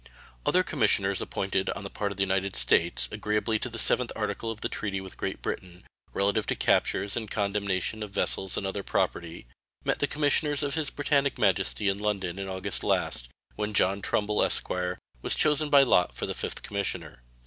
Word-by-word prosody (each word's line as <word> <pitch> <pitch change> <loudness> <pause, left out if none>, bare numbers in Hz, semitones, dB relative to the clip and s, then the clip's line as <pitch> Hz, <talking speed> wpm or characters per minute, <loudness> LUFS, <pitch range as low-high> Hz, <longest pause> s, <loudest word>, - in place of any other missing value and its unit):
Other - - +4
commissioners - - +1
appointed 95 -1 -1
on 105 - -4
the 100 - -5
part 100 -1 -2
of 100 - -7
the 100 - +2
United 95 0 0
States, 65 +7 +3
agreeably 105 +1 0
to 120 - -3
the 115 - -7
7th 125 +2 +3
article 105 +1 -2
of 110 -1 -5
the - - 0
treaty 100 -2 -3
with 95 -1 -9
Great - - -4
Britain, 90 -1 -5 0.3
relative 100 +2 +1
to - - 0
captures 100 0 +2
and 110 -3 -3
condemnation 100 0 -1
of 105 - -4
vessels 95 -1 +1
and 100 - -2
other 95 +1 -2
property, 85 -4 -2 0.4
met - - +1
the - - +1
commissioners 145 0 +1
of 140 -1 -1
His 155 -3 0
Britannic 140 -1 +1
Majesty 100 +1 +2
in 100 0 +1
London 100 -3 -2
in 95 - -4
August 95 0 -2
last, - - +1 0.3
when 105 0 -3
John 100 +1 +2
Trumbull, 105 +1 0
esq., - - +1 0.5
was - - +1
chosen 150 0 +2
by 140 -1 +7
lot 90 -9 +3
for - - -3
the - - -3
5th - - -4
commissioner. 100 -10 -4
100 Hz, 190 wpm, -28 LUFS, 95-110 Hz, 0.5 s, by